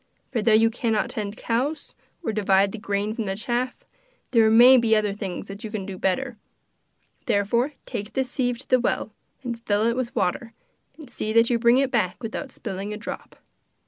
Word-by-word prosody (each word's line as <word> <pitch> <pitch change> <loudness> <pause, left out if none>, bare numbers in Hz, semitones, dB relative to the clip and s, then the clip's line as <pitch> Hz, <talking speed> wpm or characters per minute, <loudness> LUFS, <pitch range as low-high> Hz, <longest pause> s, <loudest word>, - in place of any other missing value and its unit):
For 240 -4 0
though 220 +1 +3
you 225 +1 +4
cannot 225 -2 -1
tend 210 -1 -4
cows, 265 +7 -2 0.3
or 225 - -2
divide 195 -1 +3
the 225 - -7
grain 205 0 -2
from 225 -2 -3
the 195 -1 -2
chaff, 240 +4 -3 0.5
there 225 -3 +5
may 240 +4 +8
be 230 -2 +3
other 210 -2 +1
things 200 -1 -5
that 200 +1 -9
you 220 - -5
can 210 -3 -4
do 195 -1 -6
better. 230 +7 -1 0.9
Therefore 235 +8 +1
take 205 +2 -5
this 265 -2 -1
sieve 245 -3 0
to 255 - -8
the 255 - +4
well, 235 -2 -1 0.3
and 235 -2 -5
fill 210 -1 +1
it 235 0 +2
with 250 -2 -3
water, 210 +2 -1 0.4
and 310 -3 -11
see 215 -2 -4
that 230 +1 +4
you 235 - +2
bring 235 +1 +5
it 270 -1 +1
back 200 -2 0
without 240 +4 -5
spilling 195 -3 -5
a 210 - -4
drop. 225 - -8
225 Hz, 200 wpm, -24 LUFS, 205-245 Hz, 0.9 s, may